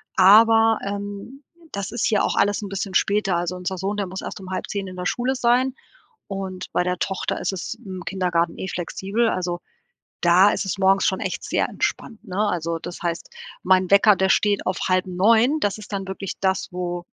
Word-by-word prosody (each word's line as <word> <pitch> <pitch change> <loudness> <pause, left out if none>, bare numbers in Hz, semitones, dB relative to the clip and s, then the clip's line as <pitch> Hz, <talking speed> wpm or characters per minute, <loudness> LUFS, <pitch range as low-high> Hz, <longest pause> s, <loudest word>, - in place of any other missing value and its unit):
aber, 225 +3 +6
ähm, 205 +7 -6 0.3
das 200 0 -4
ist 240 - -1
hier 210 -3 +2
auch - - 0
alles 205 +1 +2
'n 200 - -6
bisschen 195 -1 -4
später. 200 -3 +2
Also, 175 +1 -2
unser 180 +1 -4
Sohn, 200 +2 -2
der 200 -2 -2
muss 190 +1 -6
erst - - -7
um 190 -1 -10
9:30 195 +1 -3
in 185 - -8
der 180 0 -5
Schule 245 +6 0
sein 250 +2 +2 0.5
und 190 -2 -6
bei - - +1
der 180 0 -1
Tochter 190 -1 -2
ist - - -1
es 185 - -4
im 185 -4 -7
Kindergarten 175 -3 0
eh 190 - -4
flexibel 195 +6 -1
also, 175 -1 -2 0.6
da 180 +4 +6
ist - - -2
es 195 0 -3
morgens 195 0 +3
schon 190 - 0
echt - - -3
sehr - - 0
entspannt, 225 -3 -3
ne? 195 +3 -1
Also, 165 -2 -2
das 175 +1 -8
heißt, 170 -1 -3 0.3
mein 185 -1 +3
Wecker, 200 0 +6
der 190 - +1
steht 205 -1 +2
auf 185 - -1
8:30, 205 +9 +3
das 205 +1 -1
ist 210 0 -11
dann 195 -1 -3
wirklich 195 0 -5
das, 190 0 0
wo 175 -1 -4
195 Hz, 200 wpm, -23 LUFS, 185-205 Hz, 0.6 s, aber